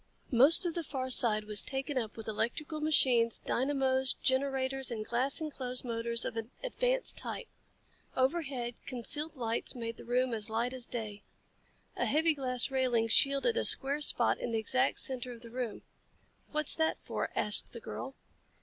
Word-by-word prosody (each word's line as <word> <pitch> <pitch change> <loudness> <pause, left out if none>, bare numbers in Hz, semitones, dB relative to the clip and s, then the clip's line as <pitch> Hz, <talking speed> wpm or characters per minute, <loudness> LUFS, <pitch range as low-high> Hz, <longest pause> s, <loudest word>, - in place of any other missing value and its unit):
Most 275 +9 +6
of 340 - -1
the 340 - -2
far 260 -3 -4
side 215 -4 +3
was 210 -1 +4
taken 270 +2 -3
up 225 -4 -3
with 225 - -8
electrical 295 +8 -3
machines, 250 -7 +2
dynamos, 265 0 +1
generators 265 0 -1
and 220 -3 -5
glass 255 +6 -1
enclosed 260 -5 0
motors 235 0 -2
of - - -4
an 225 0 -5
advanced - - -1
type. - - -6 0.7
Overhead, 260 -3 -1
concealed 295 +5 -1
lights 230 -2 -3
made 230 -1 -5
the - - -11
room 250 +1 0
as 220 -1 -3
light 235 +3 -1
as 255 -2 -4
day. 215 -3 -6 0.7
A - - -1
heavy 320 +3 +3
glass 255 -2 +1
railing 245 -4 +1
shielded 275 - +3
a - - +1
square 280 +2 +5
spot - - +1
in - - -4
the 230 - -1
exact 255 +4 0
center 250 -1 -2
of 235 0 -14
the 230 - -12
room. 245 -3 -5 0.7
"What's 305 -2 +1
that 320 0 0
for?" - - -3
asked 210 - +5
the 235 - -9
girl. 265 +4 -7
255 Hz, 170 wpm, -31 LUFS, 235-280 Hz, 0.7 s, Most